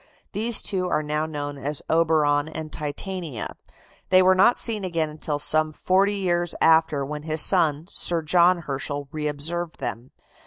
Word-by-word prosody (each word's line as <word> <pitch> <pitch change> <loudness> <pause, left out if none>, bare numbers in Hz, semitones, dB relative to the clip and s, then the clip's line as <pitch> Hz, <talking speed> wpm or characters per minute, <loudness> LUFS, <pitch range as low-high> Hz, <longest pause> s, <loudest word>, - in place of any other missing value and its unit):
These 225 +2 +1
two 185 -2 -1
are 155 - 0
now 150 +1 -2
known 145 -2 -5
as 145 +2 -1
Oberon 155 -2 +2
and 155 -1 -7
Titania. 155 - -5 0.5
They 185 0 +5
were 185 +1 +5
not 195 +6 +4
seen 220 -4 0
again 165 -4 -2
till 150 -1 -2
some 155 +1 +1
forty 195 +5 +1
years 175 -3 -1
after, 160 -3 +3
when 150 +1 -6
his 155 0 +2
son, 160 -5 +2
Sir 170 -3 0
John 175 +2 +3
Herschel, 140 0 -5
reobserved 155 +3 -3
them. 120 -1 -5
160 Hz, 155 wpm, -24 LUFS, 150-180 Hz, 0.5 s, They